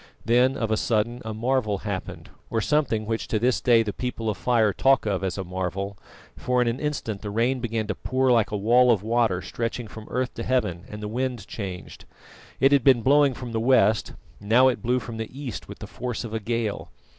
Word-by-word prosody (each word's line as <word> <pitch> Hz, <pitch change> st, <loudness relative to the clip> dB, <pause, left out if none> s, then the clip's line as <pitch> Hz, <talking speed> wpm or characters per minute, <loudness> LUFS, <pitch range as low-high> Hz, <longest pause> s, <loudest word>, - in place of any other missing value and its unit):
Then 125 Hz, +3 st, +3 dB
of 115 Hz, -2 st, -2 dB
a 110 Hz, -, +2 dB
sudden 120 Hz, +2 st, 0 dB
a 110 Hz, -, -5 dB
marvel 110 Hz, -1 st, 0 dB
happened, 100 Hz, -2 st, -6 dB, 0.2 s
or 115 Hz, -, 0 dB
something 115 Hz, -4 st, 0 dB
which 115 Hz, +1 st, -2 dB
to 110 Hz, -, 0 dB
this 125 Hz, +3 st, +1 dB
day 120 Hz, -3 st, +4 dB
the 105 Hz, -2 st, -4 dB
People 115 Hz, -3 st, -3 dB
of 105 Hz, -, -7 dB
Fire 115 Hz, -5 st, +2 dB
talk 135 Hz, +2 st, +3 dB
of 95 Hz, -2 st, -1 dB
as 95 Hz, 0 st, -2 dB
a 95 Hz, -, -3 dB
marvel, 95 Hz, +2 st, -4 dB, 0.4 s
for 125 Hz, 0 st, 0 dB
in 125 Hz, -, +2 dB
an 115 Hz, +2 st, -1 dB
instant 140 Hz, -9 st, -3 dB
the 105 Hz, -, -5 dB
rain 120 Hz, +5 st, +1 dB
began 115 Hz, -2 st, -2 dB
to 105 Hz, -, -2 dB
pour 130 Hz, +4 st, 0 dB
like 115 Hz, -3 st, +3 dB
a 105 Hz, -, -2 dB
wall 120 Hz, +5 st, +4 dB
of 105 Hz, -4 st, +1 dB
water 110 Hz, -5 st, +1 dB
stretching 115 Hz, 0 st, -4 dB
from 110 Hz, 0 st, -11 dB
earth 125 Hz, 0 st, -2 dB
to 115 Hz, -, -5 dB
heaven, 105 Hz, -9 st, -1 dB
and 105 Hz, 0 st, -8 dB
the -, -, -3 dB
wind 120 Hz, -1 st, -3 dB
changed. 95 Hz, -4 st, -7 dB, 0.5 s
It 135 Hz, +1 st, +5 dB
had 140 Hz, -3 st, +4 dB
been 125 Hz, -3 st, +5 dB
blowing 140 Hz, -1 st, +4 dB
from 125 Hz, -1 st, -7 dB
the 115 Hz, -, -1 dB
west, 110 Hz, -3 st, +3 dB, 0.3 s
now 120 Hz, +6 st, +4 dB
it 125 Hz, -, -3 dB
blew 125 Hz, +1 st, +1 dB
from 115 Hz, -2 st, -6 dB
the 110 Hz, 0 st, -4 dB
east 130 Hz, -7 st, -6 dB
with -, -, -8 dB
the -, -, -8 dB
force 125 Hz, -1 st, -5 dB
of 115 Hz, -2 st, -7 dB
a 110 Hz, -, -1 dB
gale. 115 Hz, -1 st, -3 dB
115 Hz, 225 wpm, -25 LUFS, 105-125 Hz, 0.5 s, It